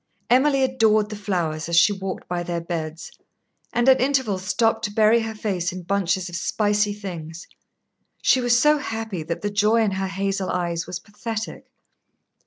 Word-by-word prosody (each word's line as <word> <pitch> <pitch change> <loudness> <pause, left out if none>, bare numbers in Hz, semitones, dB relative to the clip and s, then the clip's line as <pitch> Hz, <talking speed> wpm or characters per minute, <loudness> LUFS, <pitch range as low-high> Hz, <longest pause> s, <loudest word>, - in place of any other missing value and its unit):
Emily 270 +2 +4
adored 220 -5 +2
the - - -4
flowers 170 -6 -2
as 170 - 0
she 205 +4 +6
walked 190 -1 -6
by 175 -1 -2
their 175 0 -3
beds, 165 -1 -5 0.6
and 240 +1 +1
at 265 -1 +6
intervals 255 -8 +1
stopped 225 +3 +1
to 205 - -3
bury 220 +2 +4
her 225 -1 -4
face 190 -5 -2
in 185 0 -7
bunches 190 0 0
of 175 - -7
spicy 210 +3 +1
things. 175 -5 -7 0.8
She 260 - +4
was 240 -1 +3
so 300 +4 +4
happy 225 - -4
that 170 +2 -4
the 205 - -1
joy 210 +3 +3
in 210 - +1
her 190 0 -2
hazel 195 0 -2
eyes 170 -2 -2
was 180 0 -4
pathetic. 215 +4 -6
205 Hz, 175 wpm, -23 LUFS, 175-225 Hz, 0.8 s, she